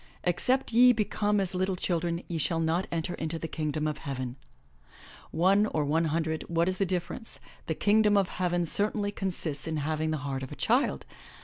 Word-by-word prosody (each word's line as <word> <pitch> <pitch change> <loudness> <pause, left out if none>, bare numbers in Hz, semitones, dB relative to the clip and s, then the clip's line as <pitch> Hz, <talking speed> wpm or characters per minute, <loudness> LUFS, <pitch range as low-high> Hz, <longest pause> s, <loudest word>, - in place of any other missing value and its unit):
'Except 235 +9 +1
ye 250 +2 +7
become 210 -1 0
as 190 -2 -1
little 185 +1 0
children 170 -1 -1
ye 165 -2 -3
shall 165 +2 0
not 165 +3 0
enter 165 +1 -2
into 160 0 -3
the 165 - -4
Kingdom 155 -1 -2
of 150 -1 -2
Heaven.' 130 -3 -4 0.9
One 195 +5 +3
or 155 -7 -1
one 160 +3 +2
hundred, 160 0 -1
what 170 0 +1
is 185 0 0
the 195 - +2
difference 185 +5 -4
— - - -25
the 160 - -1
Kingdom 210 +2 +4
of 195 -2 +3
Heav 180 -1 -1
en 175 -1 +1
certainly 205 +3 +1
consists 175 -8 -3
in 160 -1 -2
having 155 +1 -1
the 155 - 0
heart 135 -1 -3
of 130 - -7
a - - -6
child! 70 - +1
170 Hz, 200 wpm, -29 LUFS, 155-195 Hz, 0.9 s, ye